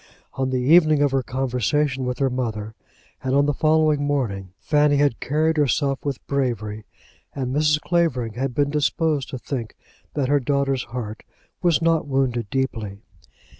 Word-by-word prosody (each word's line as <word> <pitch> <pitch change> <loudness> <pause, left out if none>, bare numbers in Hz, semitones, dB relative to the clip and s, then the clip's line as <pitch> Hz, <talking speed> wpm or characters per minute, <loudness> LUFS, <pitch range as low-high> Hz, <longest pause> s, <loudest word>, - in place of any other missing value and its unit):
On 130 -1 -1
the 130 - 0
evening 155 +2 +5
of 145 - +2
her 135 0 +1
conversation 130 +2 -1
with 125 0 -2
her 135 -1 +1
mother, 110 -4 -3 0.5
and 130 0 0
on 140 0 +4
the 145 - +1
following 155 0 +2
morning, 115 -10 -1
Fanny 150 -1 +3
had 140 -4 +2
carried 155 +3 +1
herself 140 -1 +1
with 140 -3 -4
bravery, 110 -6 -2 0.5
and 130 -1 -2
Mrs. 150 0 +3
Clavering 150 -11 0
had 125 +1 -3
been 145 -1 +1
disposed 150 -1 0
to 130 - -5
think 120 -3 -5 0.4
that 140 -3 0
her 145 +1 +3
daughter's 135 -1 0
heart 115 -3 -6 0.4
was 170 -2 +2
not 165 -2 +2
wounded 130 -5 0
deeply. 110 -6 -3
135 Hz, 160 wpm, -23 LUFS, 125-150 Hz, 0.5 s, evening